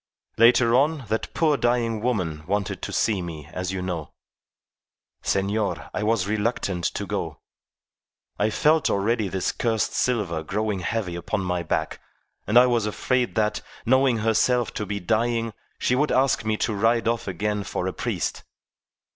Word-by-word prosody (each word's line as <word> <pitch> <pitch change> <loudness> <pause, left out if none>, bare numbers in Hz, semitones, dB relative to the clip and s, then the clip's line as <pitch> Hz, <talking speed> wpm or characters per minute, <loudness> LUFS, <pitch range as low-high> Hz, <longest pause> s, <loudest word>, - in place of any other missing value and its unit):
Later 120 0 +6
on, 140 +1 +2
that 110 - -2
poor 155 -3 +3
dying 120 -3 +1
woman 90 -11 -1
wanted 100 0 -1
to - - -4
see 105 -4 +1
me, 80 -4 -7
as 90 0 -3
you 95 -1 -3
know. 85 -5 -4 1.1
Senor, 100 -5 -1
I - - -2
was 105 -2 +1
reluctant 105 -4 -1
to - - -2
go. - - -4 1.0
I 105 - +3
felt 155 +7 +3
already 105 +2 +1
this 95 0 -1
cursed 115 -3 0
silver 105 -10 0
growing 105 +4 -2
heavy 90 0 -2
upon 85 +4 -2
my 90 -1 -1
back, 85 - -2 0.5
and 105 +4 +4
I 125 - +9
was 120 -4 +1
afraid 125 +3 0
that, 105 -1 +1 0.2
knowing 130 0 +4
herself 115 +2 +2
to 105 - -4
be 100 +1 -2
dying, 115 +3 0 0.2
she - - +1
would 145 +4 +2
ask 130 -2 +2
me 110 0 +1
to 110 - -2
ride 115 +3 +2
off 115 -2 0
again 105 +1 -1
for - - -3
a - - -2
priest. - - -2
110 Hz, 160 wpm, -24 LUFS, 95-120 Hz, 1.1 s, I